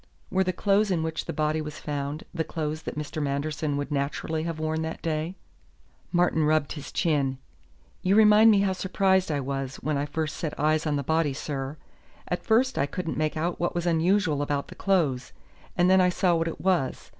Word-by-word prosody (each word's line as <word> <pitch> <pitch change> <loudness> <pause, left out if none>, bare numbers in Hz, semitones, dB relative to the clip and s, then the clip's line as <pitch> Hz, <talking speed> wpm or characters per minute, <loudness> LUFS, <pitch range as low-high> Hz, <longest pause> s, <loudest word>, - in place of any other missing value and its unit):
Were 190 0 +3
the 185 - 0
clothes 200 +3 +2
in 170 -4 +1
which 160 0 -3
the - - -3
body 155 0 0
was 150 0 -6
found 145 +1 -4
the 165 -2 -1
clothes 155 -1 -4
that - - -6
Mr. 150 +1 -4
Manderson 145 +1 -1
would 145 +1 -4
naturally 145 +3 -2
have 165 -2 -3
worn 155 0 -1
that 160 0 -5
day?" 160 +2 -2 0.8
Martin 175 -3 +2
rubbed 155 -1 +2
his 145 -2 -7
chin. 140 -6 +1 0.6
"You 190 +1 +2
remind 215 +1 +7
me 205 -2 +5
how 195 -1 +1
surprised 190 -1 +1
I 145 - 0
was 135 0 -3
when 150 -2 -2
I 145 - -2
first 155 0 -3
set 155 -3 -4
eyes 155 +1 +2
on 150 - +1
the 140 - -1
body, 160 0 +1
sir. 140 0 -4 0.5
At - - -2
first 250 +4 +2
I 140 - +2
couldn't 165 +2 -4
make 155 0 -1
out 170 +2 -1
what 175 - -1
was 175 0 -1
unusual 170 -2 +2
about 145 -1 -2
the - - -8
clothes, 155 -10 0 0.4
and 175 0 +4
then 190 0 +6
I 180 - +4
saw 180 0 +2
what 165 0 +1
it 165 - -5
was. 180 -8 0
160 Hz, 205 wpm, -26 LUFS, 145-180 Hz, 0.8 s, remind